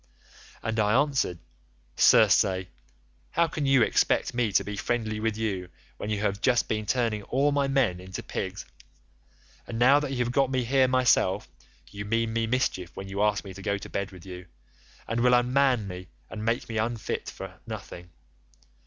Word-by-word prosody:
"And 115 Hz, -1 st, -2 dB
I 105 Hz, +4 st, +3 dB
answered, 135 Hz, -11 st, 0 dB, 0.6 s
'Circe, 95 Hz, -1 st, +5 dB, 0.7 s
how 170 Hz, 0 st, +2 dB
can 150 Hz, -2 st, -3 dB
you 135 Hz, -3 st, +5 dB
expect -, -, +1 dB
me 120 Hz, -3 st, 0 dB
to 100 Hz, -, +4 dB
be 105 Hz, +1 st, -5 dB
friendly 110 Hz, -1 st, -2 dB
with 110 Hz, -1 st, -1 dB
you 95 Hz, -5 st, -3 dB, 0.3 s
when 105 Hz, -, -5 dB
you 105 Hz, -1 st, -1 dB
have 100 Hz, 0 st, -1 dB
just 125 Hz, -3 st, +2 dB
been 110 Hz, -1 st, -2 dB
turning 115 Hz, -4 st, 0 dB
all 135 Hz, +7 st, +1 dB
my 140 Hz, -1 st, +1 dB
men 130 Hz, -10 st, +1 dB
into 95 Hz, +1 st, -7 dB
pigs? -, -, -5 dB, 1.0 s
And 115 Hz, -, -5 dB
now 130 Hz, +5 st, +6 dB
that 145 Hz, -1 st, -3 dB
you 135 Hz, -, -3 dB
have 120 Hz, -, -2 dB
got 135 Hz, 0 st, +2 dB
me 130 Hz, -1 st, 0 dB
here 130 Hz, +2 st, +3 dB
myself, 125 Hz, -7 st, +2 dB, 0.4 s
you 100 Hz, 0 st, -6 dB
mean 115 Hz, +2 st, 0 dB
me 115 Hz, 0 st, 0 dB
mischief 110 Hz, -8 st, -1 dB
when 95 Hz, 0 st, -6 dB
you 100 Hz, +1 st, -3 dB
ask 105 Hz, -1 st, +1 dB
me 95 Hz, -, -8 dB
to 95 Hz, -, -10 dB
go 100 Hz, +1 st, -1 dB
to -, -, -9 dB
bed 100 Hz, -1 st, -2 dB
with 90 Hz, -1 st, -13 dB
you, 90 Hz, -1 st, -9 dB, 0.6 s
and 115 Hz, +1 st, -1 dB
will 125 Hz, +1 st, +5 dB
unman 125 Hz, -2 st, +2 dB
me 90 Hz, -1 st, -8 dB, 0.2 s
and 110 Hz, -, -6 dB
make 115 Hz, +2 st, -1 dB
me 115 Hz, -1 st, -3 dB, 0.2 s
fit -, -, -4 dB
for -, -, -9 dB
nothing. 90 Hz, 0 st, -8 dB
115 Hz, 185 wpm, -27 LUFS, 100-125 Hz, 1.0 s, now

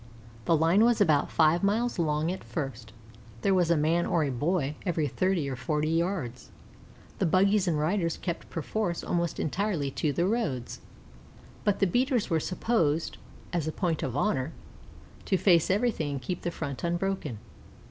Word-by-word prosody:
The 165 Hz, -, +4 dB
line 165 Hz, +7 st, +4 dB
was 235 Hz, -1 st, +3 dB
about 155 Hz, -8 st, +3 dB
five 160 Hz, +2 st, +3 dB
miles 220 Hz, +2 st, +1 dB
long 155 Hz, 0 st, +1 dB
at 190 Hz, -, -6 dB
first, 135 Hz, -8 st, -5 dB
and 110 Hz, -, -19 dB, 0.5 s
there 195 Hz, -, +3 dB
was 180 Hz, -3 st, +2 dB
a 170 Hz, -, +4 dB
man 165 Hz, +3 st, +2 dB
or 165 Hz, -, +2 dB
a 140 Hz, -, -1 dB
boy 145 Hz, +2 st, 0 dB
every 165 Hz, -5 st, 0 dB
thirty 180 Hz, +1 st, 0 dB
or 135 Hz, -, -3 dB
forty 150 Hz, +3 st, -1 dB
yards. 165 Hz, -8 st, -2 dB, 0.7 s
The -, -, +2 dB
buggies 195 Hz, +3 st, +3 dB
and 165 Hz, -3 st, +1 dB
riders 165 Hz, +2 st, 0 dB
kept 170 Hz, -2 st, -5 dB
perforce 175 Hz, +2 st, -2 dB
almost 170 Hz, -2 st, -1 dB
entirely 170 Hz, -4 st, -1 dB
to 150 Hz, +2 st, -1 dB
the 170 Hz, +5 st, 0 dB
roads; 180 Hz, -, -2 dB, 0.8 s
but 205 Hz, -1 st, +2 dB
the -, -, +3 dB
beaters 245 Hz, -, +1 dB
were 165 Hz, -, +3 dB
supposed, 170 Hz, -3 st, 0 dB, 0.3 s
as 165 Hz, -3 st, -1 dB
a -, -, 0 dB
point 165 Hz, -2 st, -1 dB
of 130 Hz, 0 st, -3 dB
honor, 145 Hz, -5 st, 0 dB, 0.7 s
to 190 Hz, -, +2 dB
face 175 Hz, -4 st, +4 dB
everything, 195 Hz, -8 st, 0 dB
and 135 Hz, -, -4 dB
keep 175 Hz, +7 st, -3 dB
the 175 Hz, -, -2 dB
front 145 Hz, -5 st, -5 dB
unbroken. 175 Hz, -, -2 dB
170 Hz, 170 wpm, -28 LUFS, 150-190 Hz, 0.8 s, The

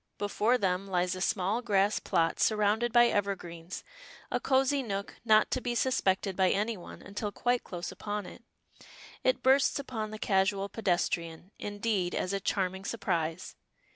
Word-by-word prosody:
Before 210 Hz, +4 st, +1 dB
them 190 Hz, -2 st, 0 dB
lies 180 Hz, -1 st, 0 dB
a 185 Hz, -, -5 dB
small 195 Hz, +5 st, 0 dB
grass 205 Hz, -3 st, +2 dB
plot 165 Hz, -3 st, 0 dB
surrounded 215 Hz, +2 st, +2 dB
by 240 Hz, 0 st, +7 dB
evergreens, 185 Hz, -6 st, -2 dB, 0.5 s
a -, -, +1 dB
cosy 270 Hz, +1 st, +2 dB
nook 200 Hz, -5 st, -4 dB
not 215 Hz, -2 st, +4 dB
to 255 Hz, -, 0 dB
be 240 Hz, -1 st, -2 dB
suspected 195 Hz, -6 st, +1 dB
by 185 Hz, -1 st, +3 dB
any 215 Hz, +4 st, 0 dB
one 180 Hz, -, -11 dB
until 205 Hz, +1 st, -4 dB
quite 245 Hz, +3 st, 0 dB
close 175 Hz, -1 st, -6 dB
upon 205 Hz, -1 st, -4 dB
it. -, -, -11 dB, 0.8 s
It 255 Hz, -, +1 dB
bursts 265 Hz, +1 st, +4 dB
upon 235 Hz, -6 st, -4 dB
the 215 Hz, -, -7 dB
casual 195 Hz, -1 st, +1 dB
pedestrian, 175 Hz, -3 st, -1 dB
indeed, 205 Hz, -3 st, -1 dB
as 185 Hz, -, -1 dB
a 195 Hz, -, 0 dB
charming 190 Hz, -1 st, -1 dB
surprise. 175 Hz, -6 st, -2 dB
200 Hz, 155 wpm, -30 LUFS, 185-230 Hz, 0.8 s, by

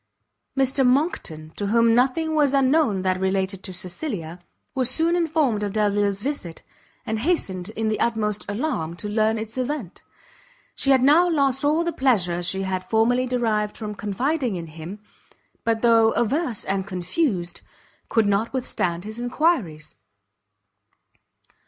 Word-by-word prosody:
Mr 270 Hz, 0 st, +2 dB
Monckton, 250 Hz, -, 0 dB
to 205 Hz, -, -3 dB
whom 230 Hz, +2 st, +4 dB
nothing 270 Hz, +7 st, +2 dB
was 290 Hz, -3 st, +3 dB
unknown 270 Hz, -7 st, +2 dB
that 185 Hz, -1 st, 0 dB
related 190 Hz, 0 st, -1 dB
to 190 Hz, -, -6 dB
Cecilia, 180 Hz, -, -5 dB, 0.3 s
was 260 Hz, -2 st, +2 dB
soon 325 Hz, +6 st, +3 dB
informed 310 Hz, -10 st, +1 dB
of 205 Hz, -1 st, -2 dB
Delvile's 205 Hz, -1 st, +1 dB
visit, 260 Hz, -, -4 dB, 0.4 s
and 220 Hz, -2 st, -2 dB
hastened 210 Hz, -, -1 dB
in 220 Hz, 0 st, -1 dB
the 215 Hz, -1 st, 0 dB
utmost 210 Hz, -3 st, 0 dB
alarm, 205 Hz, -, -2 dB
to 210 Hz, -, -5 dB
learn 215 Hz, +1 st, +1 dB
its 220 Hz, +3 st, -5 dB
event. 255 Hz, -, -4 dB, 0.7 s
She 275 Hz, -, -1 dB
had 265 Hz, -2 st, +5 dB
now 325 Hz, +6 st, +5 dB
lost 275 Hz, -4 st, +1 dB
all 305 Hz, +3 st, +2 dB
the 340 Hz, 0 st, -2 dB
pleasure 195 Hz, -, +1 dB
she 190 Hz, +2 st, -1 dB
had 185 Hz, -1 st, -2 dB
formerly 245 Hz, +4 st, +2 dB
derived 220 Hz, -4 st, 0 dB
from 215 Hz, -2 st, -5 dB
confiding 240 Hz, +5 st, -1 dB
in 170 Hz, -2 st, -5 dB
him, 170 Hz, +6 st, -8 dB, 0.6 s
but 225 Hz, 0 st, 0 dB
though 225 Hz, -1 st, +5 dB
averse 240 Hz, +1 st, 0 dB
and 195 Hz, 0 st, -2 dB
confused, 185 Hz, -, -2 dB, 0.5 s
could 225 Hz, -2 st, +3 dB
not 205 Hz, +3 st, +1 dB
withstand 180 Hz, -9 st, -2 dB
his 215 Hz, +3 st, -7 dB
enquiries. 245 Hz, -, 0 dB
220 Hz, 145 wpm, -23 LUFS, 195-270 Hz, 0.7 s, had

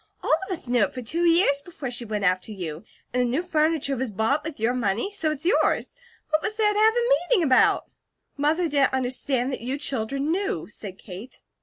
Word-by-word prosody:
All -, -, +2 dB
of 370 Hz, -3 st, -2 dB
us -, -, -15 dB
knew 245 Hz, -1 st, +2 dB
it -, -, -10 dB
for 255 Hz, -, -5 dB
two 335 Hz, +9 st, -1 dB
years 330 Hz, -4 st, +4 dB
before 295 Hz, -7 st, -6 dB
she 240 Hz, -1 st, -5 dB
went 210 Hz, -2 st, -3 dB
after 185 Hz, +2 st, +1 dB
you. 170 Hz, -5 st, -6 dB, 0.3 s
And 250 Hz, -, +2 dB
the 245 Hz, -, +1 dB
new 280 Hz, +9 st, 0 dB
furniture 310 Hz, -4 st, +1 dB
was 260 Hz, -1 st, -2 dB
bought 220 Hz, +9 st, 0 dB
with 310 Hz, -4 st, -6 dB
your 230 Hz, +3 st, +1 dB
money, 235 Hz, -, -1 dB
so 340 Hz, -6 st, 0 dB
it's 305 Hz, +1 st, -4 dB
yours; 370 Hz, -, +2 dB, 0.4 s
what 310 Hz, 0 st, +2 dB
was 430 Hz, +3 st, -3 dB
there 420 Hz, -1 st, +3 dB
to 415 Hz, -, 0 dB
have 440 Hz, +1 st, +5 dB
a 480 Hz, 0 st, +1 dB, 0.2 s
meeting 430 Hz, -9 st, +4 dB
about?" 265 Hz, -4 st, +4 dB, 0.5 s
"Mother 310 Hz, +5 st, +1 dB
didn't 280 Hz, -3 st, +2 dB
understand 260 Hz, 0 st, -1 dB
that -, -, -4 dB
you 255 Hz, +4 st, -3 dB
children 275 Hz, +1 st, -1 dB
knew," 395 Hz, +4 st, -1 dB
said 200 Hz, -3 st, -8 dB
Kate. 200 Hz, +6 st, -10 dB
275 Hz, 215 wpm, -25 LUFS, 240-330 Hz, 0.5 s, have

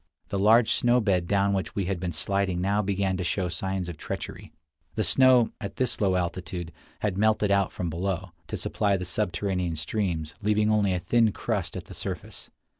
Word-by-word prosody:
The 100 Hz, -, -1 dB
large 110 Hz, +3 st, +5 dB
snow 125 Hz, -2 st, +4 dB
bed 95 Hz, -6 st, +1 dB
down 100 Hz, +1 st, +2 dB
which 95 Hz, -1 st, -2 dB
we 100 Hz, -, 0 dB
had 95 Hz, -1 st, -2 dB
been 90 Hz, -1 st, -2 dB
sliding 95 Hz, +3 st, 0 dB
now 100 Hz, +3 st, +1 dB
began 95 Hz, -1 st, 0 dB
to 90 Hz, -, -2 dB
show 90 Hz, 0 st, -1 dB
signs 95 Hz, +2 st, -2 dB
of 85 Hz, -3 st, -6 dB
treachery. -, -, -6 dB, 0.4 s
The 110 Hz, -, +1 dB
snow, 125 Hz, +4 st, +5 dB
at 100 Hz, -1 st, -5 dB
this 125 Hz, -3 st, -1 dB
low 95 Hz, -2 st, +3 dB
altitude, 85 Hz, -1 st, -3 dB, 0.3 s
had 100 Hz, -2 st, -1 dB
melted 110 Hz, -1 st, +3 dB
out 100 Hz, -1 st, +2 dB
from 85 Hz, -2 st, -3 dB
below, 95 Hz, +2 st, -3 dB, 0.2 s
to -, -, -4 dB
supply 100 Hz, -2 st, 0 dB
the 90 Hz, -, -4 dB
subterranean 90 Hz, -2 st, -1 dB
streams, 80 Hz, -1 st, -2 dB
leaving 105 Hz, +1 st, +2 dB
only 105 Hz, -2 st, +3 dB
a -, -, -1 dB
thin 115 Hz, +3 st, +3 dB
crust -, -, -3 dB
at -, -, -6 dB
the -, -, -11 dB
surface. -, -, -6 dB
95 Hz, 190 wpm, -27 LUFS, 90-105 Hz, 0.4 s, large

